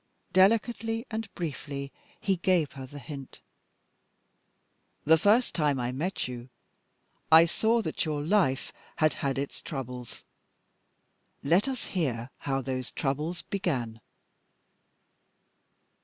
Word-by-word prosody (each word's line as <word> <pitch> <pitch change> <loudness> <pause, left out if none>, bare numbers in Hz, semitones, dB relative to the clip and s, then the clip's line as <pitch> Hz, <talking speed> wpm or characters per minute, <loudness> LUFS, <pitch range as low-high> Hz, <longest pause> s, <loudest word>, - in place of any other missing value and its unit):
Delicately 225 +3 +3
and 220 -2 -4
briefly 140 -4 -4 0.3
he 195 -4 +1
gave 175 -4 +2
her 135 -1 -8
the 145 - -10
hint. 140 -1 -8 1.7
"The 160 +1 +6
first 220 +8 +4
time 150 -5 +1
I 120 0 -1
met 155 +7 -2
you," 125 -1 -5
he 120 - -11 0.8
said, - - +2
"I 165 +1 +10
saw 225 +7 +2
that - - -1
your 150 -2 -2
life 160 -7 +2 0.2
had 155 -1 +3
had 135 -1 0
its 140 +1 -4
troubles. 125 -4 -6 1.2
Let 175 - +3
us 265 -2 -3
hear 130 -9 -2
how 135 -1 -1
those 130 -1 -3
troubles 150 +5 -2
began." 125 - -2
150 Hz, 120 wpm, -29 LUFS, 135-190 Hz, 1.7 s, I